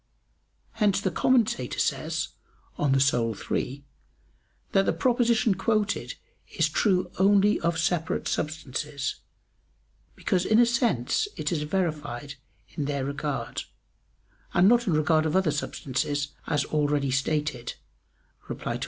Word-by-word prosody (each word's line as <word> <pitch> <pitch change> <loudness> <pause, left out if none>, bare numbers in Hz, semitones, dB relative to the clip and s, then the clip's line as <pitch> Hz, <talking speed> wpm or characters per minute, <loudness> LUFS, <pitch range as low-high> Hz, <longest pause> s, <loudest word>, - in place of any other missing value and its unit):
Hence 210 -4 +2
the 190 -2 -1
Commentator 220 - +1
says - - -1 0.5
(De - - -9
Anima 135 -5 +2 0.2
iii) 140 +2 -2 0.9
that 195 0 +3
the - - +3
proposition 240 -4 +2
quoted 215 +1 -1 0.4
is - - +3
true 185 -4 +1
only 200 +1 +4
of 170 0 0
separate 165 0 0
substances; 150 -2 -3 1.0
because 180 -1 0
in 215 +3 +3
a 240 - +7
sense 235 - +1
it - - -2
is 160 -4 0
verified 150 -5 -2 0.4
in 145 - -4
their 140 -2 -2
regard, 140 0 -3 0.9
and 175 +2 +6
not 240 +1 +4
in 180 - +2
regard 155 +1 +3
of 155 - -1
other 190 -5 +3
substances, 145 0 -2 0.2
as 145 -2 +1
already 145 -3 0
stated 140 -2 -1 0.7
(Reply - - -4
Obj. - - -4
155 Hz, 125 wpm, -27 LUFS, 140-195 Hz, 1.0 s, a